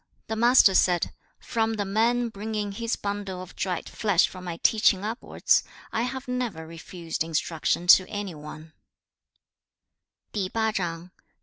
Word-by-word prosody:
The 220 - -1
Master 235 -3 +6
said, 180 -2 +2 0.3
'From 225 -2 -1
the 205 -2 -2
man 230 +4 +1
bringing 210 -1 -4
his 230 +3 -2
bundle 200 -2 -4
of 185 0 -10
dried 180 -3 -3
flesh 205 -5 +2
for 185 - -10
my 175 -2 -5
teaching 210 -3 +4
upwards, 225 +4 +1 0.3
I 225 - 0
have 260 +2 -4
never 245 -10 -3
refused 165 0 -5
instruction 165 +1 -1
to 185 +1 +7
any 205 -3 -4
one.' 155 +1 -10
200 Hz, 125 wpm, -26 LUFS, 175-225 Hz, 0.3 s, to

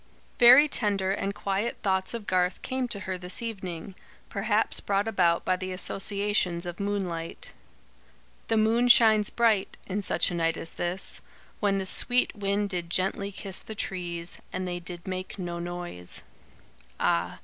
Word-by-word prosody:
Very 255 +5 +9
tender 200 -8 +1
and 200 0 -2
quiet 200 +4 -2
thoughts 190 +1 0
of 225 -3 -6
Garth 180 -1 0
came 260 -1 -2
to 205 -4 -5
her 185 -1 -4
this 180 0 -3
evening, 190 -6 -5 0.4
perhaps - - 0
brought 200 +1 0
about 175 -6 +2
by 185 - +2
the 185 0 -5
associations 195 -2 0
of 175 -1 -6
moonlight. 200 - -3 0.9
"The 225 - +2
moon 225 +3 +3
shines 220 -4 +6
bright: 220 -4 +1
in 200 +2 -2
such 195 - +2
a - - -3
night 165 -1 0
as 165 - -3
this, 175 +2 -1 0.4
When 200 -2 +2
the 190 - -2
sweet 245 +7 +3
wind 200 0 0
did 175 -3 -2
gently 195 +3 0
kiss 195 -1 -4
the 220 - -8
trees, 175 -3 -3
And 185 0 -3
they 175 0 -3
did 175 0 -6
make 185 +1 -5
no 175 -2 -4
noise 175 - -4 0.4
" - - -29
Ah! - - +1
190 Hz, 160 wpm, -27 LUFS, 175-210 Hz, 0.9 s, Very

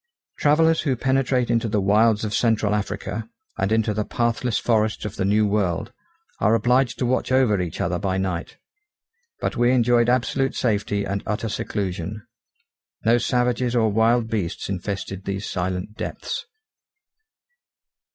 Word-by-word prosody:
Travellers 160 +2 +4
who 140 -5 0
penetrate 130 -1 +1
into 115 0 +1
the 105 0 +1
wilds 105 +2 +3
of 105 - -3
central 110 -2 +2
Africa, 105 +2 -3 0.3
and 95 +2 0
into 110 -1 +2
the 105 +1 -1
pathless 120 +1 -1
forests 110 -3 0
of 105 - -5
the 95 - -1
New 105 +2 +3
World, 105 +1 -1 0.5
are 110 - +3
obliged 125 +3 +2
to 125 - -1
watch 130 +1 0
over 125 -7 +3
each 85 -3 -5
other 90 0 -1
by 95 -2 -1
night. 95 -3 -3 0.8
But - - -2
we 120 0 +3
enjoyed 120 -1 +3
absolute 130 +2 +1
safety 105 -3 0
and 100 0 -2
utter 110 +1 -2
seclusion; 100 +1 -4 0.8
no 115 +2 +4
savages 125 0 0
or 110 -3 +3
wild 115 +2 +3
beasts 105 -7 -3
infested 95 0 -4
these 100 +1 -3
silent 90 +3 -3
depths. - - -5
110 Hz, 145 wpm, -23 LUFS, 100-120 Hz, 0.8 s, Travellers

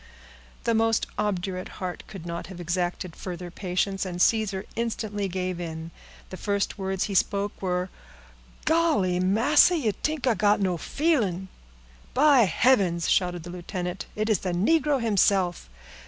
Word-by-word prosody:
The 230 - +1
most 225 0 +2
obdurate 190 -3 -2
heart 185 -3 -4
could 190 -5 -9
not 170 0 -5
have 185 -1 -10
exacted 175 0 -2
further 180 -1 -6
patience, 190 +1 -1
and 180 -2 -5
Caesar 205 -1 +2
instantly 215 -3 -2
gave 185 -1 -3
in. 160 -1 -6 0.4
The 185 - -6
first 200 0 -1
words 190 -1 -1
he 205 - -3
spoke 200 +2 0
were— 180 -1 -1 0.7
"Golly! 310 - +2
massa, 235 - +4
you 235 -9 +1
t'ink 305 +5 -3
I 250 - +4
got 205 -1 +3
no 185 -3 +1
feelin'?" 210 - 0 0.7
"By 275 -3 +6
heavens!" 185 -4 +2
shouted 175 -2 +1
the 175 - -8
lieutenant, 180 +1 -5
"it 215 +1 -1
is 215 -5 +2
the 180 -2 -3
negro 290 - +2
himself! 195 - +1
195 Hz, 145 wpm, -26 LUFS, 180-220 Hz, 0.7 s, By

